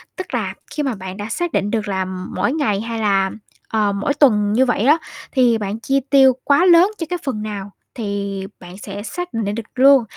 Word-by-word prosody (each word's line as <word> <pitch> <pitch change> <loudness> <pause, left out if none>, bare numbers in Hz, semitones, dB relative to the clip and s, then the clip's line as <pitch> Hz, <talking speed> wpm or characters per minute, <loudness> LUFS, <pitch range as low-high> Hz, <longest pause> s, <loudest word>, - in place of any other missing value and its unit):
Tức 370 - -7
là - - -1 0.2
khi 300 - -2
mà 265 -5 -1
bạn 190 0 -8
đã 205 +1 -5
xác 345 +8 -2
định 205 -6 0
được 220 -2 -1
là 190 -2 -1
mỗi 185 +5 -3
ngày 215 -10 0
hay 230 0 -4
là, 195 -2 +2 0.4
ờ, 210 -2 +1
mỗi 200 +8 -1
tuần 210 -8 +3
như 260 +3 +4
vậy 245 -4 0
á 300 +3 +6 0.3
thì 245 -4 +3
bạn 210 0 -4
chi 270 +4 +1
tiêu 265 -2 +6
quá 285 +5 +4
lớn 360 +3 +6
cho 330 - -3
cái 355 - -2
phần 240 -6 -3
nào 205 -2 -5 0.2
thì 200 -3 -3 0.2
bạn 180 +1 -11
sẽ 205 0 -7
xác 355 +5 -6
định 210 -2 -2
được 230 - -4
luôn 270 0 +6
220 Hz, 220 wpm, -19 LUFS, 200-275 Hz, 0.4 s, á